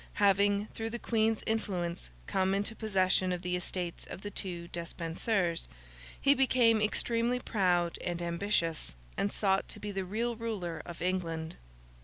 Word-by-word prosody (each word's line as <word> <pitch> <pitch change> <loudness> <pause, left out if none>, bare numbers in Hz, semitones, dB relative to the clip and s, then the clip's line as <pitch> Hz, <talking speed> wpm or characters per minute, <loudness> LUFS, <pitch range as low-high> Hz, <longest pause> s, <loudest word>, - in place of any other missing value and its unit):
Having, 200 0 +4
through 225 0 -3
the 240 - -3
Queen's 225 -2 +1
influence, 180 - -2 0.2
come 190 0 +1
into 205 +3 -1
possession 185 -4 +2
of 180 0 -2
the 180 0 0
estates 180 -1 -3
of - - -8
the 205 - -4
two 175 -4 -4
Despensers, 170 +2 -1 0.5
he 280 - +6
became 245 -5 +4
extremely 235 +3 +1
proud 180 -7 +1
and 175 -1 -2
ambitious, 170 - -1 0.2
and 200 - 0
sought 195 -2 +2
to - - -5
be 210 - -4
the 195 -1 -2
real 230 +6 -1
ruler 210 -8 -3
of 170 -1 -6
England. 165 -3 -1
190 Hz, 150 wpm, -32 LUFS, 175-220 Hz, 0.5 s, he